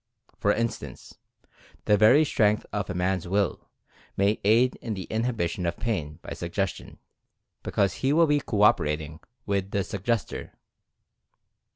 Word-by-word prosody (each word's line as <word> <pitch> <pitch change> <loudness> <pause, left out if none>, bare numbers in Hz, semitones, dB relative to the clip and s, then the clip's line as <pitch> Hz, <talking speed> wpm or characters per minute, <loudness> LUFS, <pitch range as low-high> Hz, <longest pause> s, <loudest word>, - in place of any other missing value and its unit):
For 105 - +2
instance, 115 +2 -4 0.7
the 105 - +5
very 110 +9 +6
strength 105 -6 +2
of 105 -1 -2
a 95 - -3
man's 90 -1 -1
Will 100 +1 -1 0.5
may 100 +2 +2
aid 115 +5 +4
in 110 -3 -5
the 95 - -5
inhibition 110 -6 -1
of 85 - -2
pain 80 -11 -3
by - - -6
Suggestion, - - -4 0.6
because 100 -3 0
he 135 - +2
will 165 +3 +5
be 150 -1 +2
co 105 -6 0
operating 75 -5 +2 0.3
with 100 -2 -1
the 100 -1 -1
Suggestor. 105 +4 -3
105 Hz, 140 wpm, -26 LUFS, 95-115 Hz, 0.7 s, very